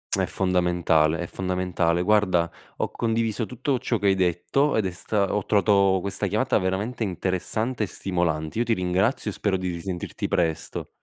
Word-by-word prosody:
È - - 0
fondamentale, 90 -4 +2
è - - -2
fondamentale. 90 -2 -1
Guarda, 95 -4 +3 0.3
ho - - -2
condiviso 115 -1 -1
tutto 125 +2 -1
ciò 120 -2 0
che 105 - -4
hai 100 - +5
detto, 95 - +1
ed 110 -3 +1
è 95 - -1
sta 100 +3 -1
ho 105 - 0
trovato 100 -2 +3
questa 100 +1 -2
chiamata 105 +3 0
veramente 95 +7 -2
interessante 105 +5 -2
e - - -1
stimolante. 85 -1 -2
Io - - +3
ti 120 -1 +1
ringrazio 95 +6 0
e - - -8
spero 100 -2 0
di 90 0 -3
risentirti 85 +1 -4
presto. 80 -3 -1
95 Hz, 170 wpm, -25 LUFS, 90-110 Hz, 0.3 s, hai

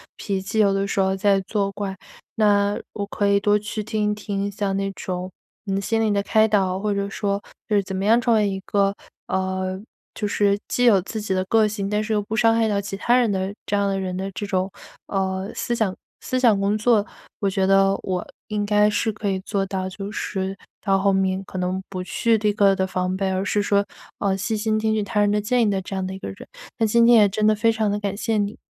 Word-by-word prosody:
脾 195 -2 -3
气， 195 +3 -5
有 200 -2 +4
的 195 0 0
时 200 - -2
候 190 0 +2
在 195 0 +3
作 200 +1 -1
怪。 195 -1 -4 0.4
那 205 -1 +3 0.2
我 205 - -3
可 205 0 -1
以 200 0 +4
多 205 +1 +3
去 210 +1 -4
听 210 -1 0
一 - - -1
听 200 -1 -3
像 200 -1 -2
那 195 0 -1
种， 185 0 -5 0.4
嗯， 195 0 0
心 225 +3 0
理 220 - +2
的 200 -1 +1
开 220 +1 +3
导， 190 -3 +1
或 210 +1 -1
者 200 0 -1
说 200 0 -2 0.3
就 210 - +2
是 200 - +3
怎 190 0 -5
么 190 - -2
样 225 +3 +5
成 240 -1 +2
为 210 -2 +3
一 195 -1 -3
个， 200 0 +1 0.3
呃， 190 0 -2 0.4
就 210 - -2
是 200 0 +2
既 245 - +1
有 215 -5 +6
自 220 +2 -5
己 205 - -5
的 185 0 0
个 220 +2 +3
性， 205 -2 -3
但 210 +1 0
是 220 - -4
又 210 -1 +1
不 220 +2 -4
伤 225 0 +4
害 225 -1 +2
到 205 -2 0
其 195 0 -6
他 240 +4 +2
人 245 -4 +3
的 190 0 -2
这 205 - 0
样 200 0 +1
的 195 -1 -1
人 185 -1 -3
的 195 +1 -4
这 205 +2 -5
种， 190 0 -1 0.4
呃， 190 0 -2
思 240 - -2
想 210 -5 0 0.3
思 255 - -1
想 230 -6 +4
工 200 +2 +1
作， 215 -1 +3 0.4
我 200 - +1
觉 190 0 0
得 195 0 +4
我 185 -2 -2 0.3
应 210 -1 -1
该 210 0 +3
是 210 +1 0
可 210 0 -5
以 190 -1 0
做 195 0 -2
到， 190 -1 -3
就 195 +2 -7
是 190 -2 -3 0.2
到 195 -2 +1
后 200 +1 +3
面 190 0 0
可 190 - -8
能 185 +1 -1
不 185 -2 -4
去 225 +5 +1
第 210 0 +1
一 - - 0
个 200 -1 +4
的 190 - 0
防 185 0 -2
备， 190 -1 0
而 190 0 -1
是 205 +1 0
说， 200 0 +2 0.4
呃， 195 -1 +1
细 220 +3 -2
心 215 0 0
听 220 0 +1
取 215 - +1
他 210 +1 -1
人 205 0 +3
的 210 0 +1
建 240 +3 +2
议 210 - +2
的 195 -1 -1
这 190 +1 -6
样 190 -1 -2
的 190 - -4
一 190 - -7
个 - - -6
人。 95 - -10 0.3
那 225 - +2
今 235 +2 +4
天 235 0 +7
也 210 -2 +6
真 210 +2 0
的 215 - +4
非 225 +2 +3
常 220 -2 0
地 205 +1 -1
感 200 -1 -3
谢 225 +1 -1
你。 205 +1 -1
200 Hz, 275 characters per minute, -23 LUFS, 195-215 Hz, 0.4 s, 天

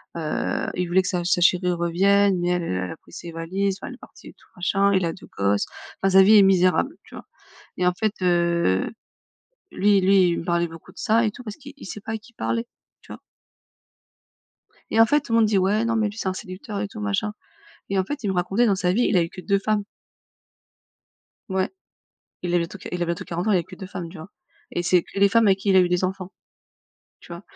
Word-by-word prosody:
heu, 160 -2 -2
il 180 -1 -1
voulait 185 +2 +3
que 185 - -5
sa 180 -2 -1
sa 175 0 +2
chérie 180 +1 +3
revienne 190 +3 +2
mais 175 0 0
elle, 180 -1 0
elle 130 - -3
elle 90 - -5
a - - -8
pris - - -22
ses 170 - -8
valises, 190 +4 -2
enfin, - - -6
elle - - -8
est - - -19
partie - - -15
et - - -11
tout - - -26
machin, 195 +2 +1
il 190 -1 +2
a 165 - -2
2 - - -14
gosses, 100 +1 +1 0.4
enfin 195 0 +2
sa 190 0 +8
vie 210 +2 +7
est - - +8
misérable, 190 - +3
tu - - -14
vois? - - -10 0.5
Et 180 - 0
en 180 - +3
fait 215 +2 -1
heu, 170 - +2 0.8
lui 200 0 +3
lui, 190 -1 +4
il 170 - -1
me - - -8
parlait 170 0 0
beaucoup 165 +2 -13
de - - -17
ça 230 0 +2
et - - +1
tout, 235 - -12
parce 215 -3 -7
qu'il 280 0 -12
il 280 - -12
sait 210 - -7
pas 220 +2 -6
à 220 - -2
qui 215 +2 -20
parler. 230 0 -2 0.4
Tu - - -12
vois? - - -10 1.7
Et 225 - +2
en 225 - +8
fait, 295 +5 +2
tout 235 - -5
le 230 - +5
monde 225 - +5
dit: 210 - +2
«Ouais, 205 +4 +2
non, 230 - 0
mais 220 -1 +2
lui, 210 - -12
c'est 205 - -3
un 190 - 0
séducteur» 190 +3 -7
et 205 - -2
tout, 215 - -10
machin, 210 0 -1 0.6
et 195 - +1
en 190 - +2
fait, 290 +5 -5
il - - 0
me 190 - -2
racontait 195 +7 +1
dans 200 - +3
sa 180 -1 +1
vie, 230 +6 +2
il - - +2
a 175 - +4
eu 165 - -3
que 185 - -9
2 200 +1 +1
femmes. 205 0 0 1.7
Ouais, 190 0 0 0.7
il 175 -1 -3
a - - +5
bientôt 170 +3 -3
q - - -10
il 180 - -3
a - - +1
bientôt 170 0 -3
40 175 +4 -3
ans, - - +3
il 195 - +4
a - - +2
eu - - -3
que - - -12
2 190 - -8
femmes 180 -3 -7
tu 185 - -12
vois? 160 +5 -10 0.4
Et 175 - -1
c'est 175 0 +3
que - - -7
les 200 - +6
femmes 230 0 +4
avec 195 0 +3
qui 200 - -2
il 190 - +4
a - - +8
eu 180 - +1
des 180 +1 0
enfants. 190 0 -5 0.9
Tu - - -12
vois? 170 +2 -8
190 Hz, 265 wpm, -23 LUFS, 175-210 Hz, 1.7 s, sa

